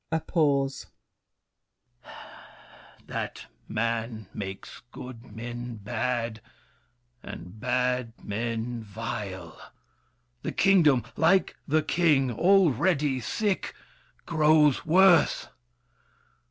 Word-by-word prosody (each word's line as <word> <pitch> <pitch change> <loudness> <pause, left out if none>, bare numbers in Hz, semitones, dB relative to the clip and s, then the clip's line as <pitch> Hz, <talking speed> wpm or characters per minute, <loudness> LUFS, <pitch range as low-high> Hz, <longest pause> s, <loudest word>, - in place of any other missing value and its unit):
[A 160 - +1
pause. 140 -5 0 2.2
That - - -5 0.2
man 115 0 -2
makes 95 -1 -7
good 120 -4 -10
men 120 +1 -6
bad, 115 +1 -3 0.8
and 90 +5 -10
bad 125 -1 0
men 115 +2 -3
vile! 105 -2 -6 0.8
The - - -4
kingdom, 155 -10 +4
like 185 +4 +3
the 155 +1 +2
king, 150 -6 +2
already 150 - +3
sick, 205 - -2 0.5
Grows 155 -3 +3
worse. 180 +1 +5
125 Hz, 75 wpm, -27 LUFS, 115-155 Hz, 2.2 s, worse